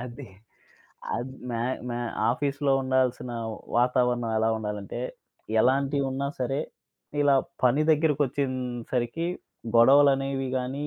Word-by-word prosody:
అది. 125 +2 -8 0.9
అద్ 130 +2 -4 0.2
మా 115 - -2 0.3
మా 120 - -2 0.3
ఆఫీస్‌లో 140 +2 0
ఉండాల్సిన 130 -1 0 0.5
వాతావరణం 125 -1 +2
ఎలా 110 - +2
ఉండాలంటే, 105 +1 -5 0.6
ఎలాంటియి 140 +3 +2
వున్నా 135 +1 -2
సరే, 135 +3 0 0.6
ఇలా 145 -1 +5 0.3
పని 130 +4 +4
దగ్గరకొచ్చేన్‌సరికి 130 -3 0 0.5
గొడవలనేవి 135 +1 +5
గాని, 135 +3 -3
130 Hz, 95 wpm, -27 LUFS, 120-140 Hz, 0.9 s, ఇలా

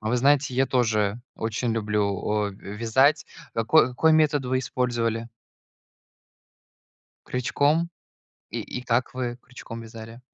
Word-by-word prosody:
А 110 - -3
вы 125 - +2
знаете, 135 +1 +3
я 135 +1 +3
тоже 110 -4 +1 0.2
очень 115 +1 -1
люблю, 105 -2 0 0.4
а, - - -4
ве 100 +1 -9
вязать. 130 +7 +3 0.3
Како 120 +6 +4
какой 160 +6 +3
метод 150 -3 +3
вы 130 +1 +1
использовали? 120 -3 -1 2.0
Крючком? 145 +6 +1 0.6
И - - -3
и 125 - -6
как 125 +1 0
вы 125 -1 -3
крючком 115 -2 -9
вязали? 115 +1 -10
120 Hz, 130 wpm, -25 LUFS, 115-130 Hz, 2.0 s, Како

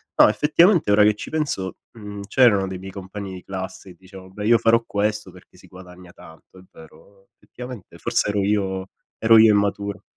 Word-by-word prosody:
no, - - +6
effettivamente 160 - +3
ora 105 +1 +5
che 105 0 +3
ci - - -9
penso, 145 -12 -3
mhmm, 105 -2 -9
c'erano 105 -4 +3
dei 95 0 -6
miei 95 +1 -9
compagni 95 0 -8
di 90 - -10
classe 95 0 -8
che - - -16
dicevo: 95 0 -14
“Beh, 105 +2 -7
io 115 0 +5
farò 115 +1 +3
questo 105 -1 -2
perché 90 0 -19
si - - -18
guadagna 90 -1 -15
tanto.” 80 +3 -17
È - - -17
vero. 80 +5 -18
Effettivamente 125 -5 -11
forse - - -1
ero 105 -1 -1
io 95 -2 -1 0.3
ero 115 0 +5
io 110 -1 +6
immaturo. 100 0 -2
100 Hz, 190 wpm, -21 LUFS, 95-105 Hz, 0.3 s, no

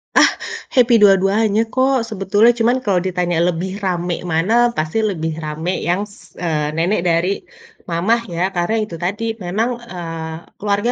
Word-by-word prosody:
Ah, - - +7 0.4
happy 240 -4 +4
dua-duanya, 200 +2 +4
kok, 260 -2 +2
Sebetulnya, 205 +3 +3
cuman 240 +3 +3
kalau 190 -4 +2
ditanya 180 -2 -1
lebih 185 +4 -4
rame 175 -2 -1
mana, 165 +7 +1 0.2
pasti 155 +6 -1
lebih 165 -7 -1
rame 155 +4 -3 0.2
yang 190 +4 +1
s 205 -1 -19
eee, 155 -4 -1
nenek 175 +4 +1
dari 170 +2 +2 0.6
mamah 190 +8 +1
ya, 170 - -2
karena 175 +5 0
itu 210 - -12
tadi 195 +5 -2 0.2
memang, 210 +7 0 0.2
eee, 165 -2 -5 0.3
keluarga 205 +3 +1
190 Hz, 150 wpm, -19 LUFS, 170-215 Hz, 0.6 s, Ah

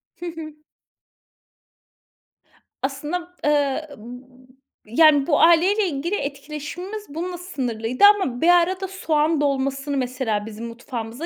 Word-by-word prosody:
Hı 350 - -9
hı. 320 -3 -7 2.3
Aslında, 305 +6 -4
eee, 295 +1 +1
b 250 +3 -13 0.3
yani, 285 +5 +4
bu 290 - +3
aileyle 365 +5 +4
ilgili 330 +6 -2
etkileşimimiz 300 +8 -6
bununla 350 +4 -5
sınırlıydı 250 - -3
ama 255 -12 -3
bir 330 - +3
arada 370 +2 +3
soğan 320 -4 0
dolmasını 275 0 -1
mesela 245 -5 -2
bizim 225 +1 -8
mutfağımıza 235 +3 -6
290 Hz, 105 wpm, -22 LUFS, 255-340 Hz, 2.3 s, yani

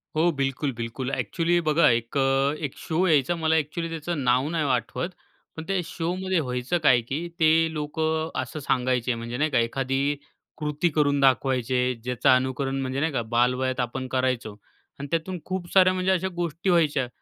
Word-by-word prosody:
हो 165 +3 +3
बिलकुल-बिलकुल. 135 -3 -3
ॲक्चुअली 175 +3 0
बघा 155 -1 +4
एक 115 +3 0
अ, 135 +1 +2
एक 140 - -6
शो 170 +3 -1
यायचा 155 +1 +3
मला 160 -1 +1
ॲक्चुअली 160 +2 -1
त्याचं 165 -2 -3
नाव 125 +2 +2
नाही 160 -2 -1
आठवत. 125 - -1 0.5
पण 160 - -6
ते 195 -1 0
शोमध्ये 180 +2 -2
व्हायचं 125 +3 -1
काय 125 -5 +5
की 140 +9 -4
ते 160 -1 +5 0.2
लोक 150 +1 -5 0.4
असं 130 +4 -4
सांगायचे 125 -2 0
म्हणजे 115 +1 -5
नाही 155 +3 +1
का 130 - +3
एखादी 135 +4 0 0.4
कृती 150 +2 0
करून 145 -2 +2
दाखवायची 130 -2 +2
आहे, 125 0 +2
ज्याचं 120 +1 -1
अनुकरण 130 +1 +1
म्हणजे 130 +1 -2
नाही 160 +3 0
का 125 - 0
बालवयात 125 +2 +1
आपण 130 +1 -2
करायचो. 130 -4 -1 0.4
आणि 140 - -5
त्यातून 170 +2 -2
खूप 185 -2 -4
साऱ्या 185 -1 +6
म्हणजे 185 0 0
अशा 190 0 +1
गोष्टी 170 +1 -2
व्हायच्या. 150 -7 +2
140 Hz, 170 wpm, -25 LUFS, 130-165 Hz, 0.5 s, साऱ्या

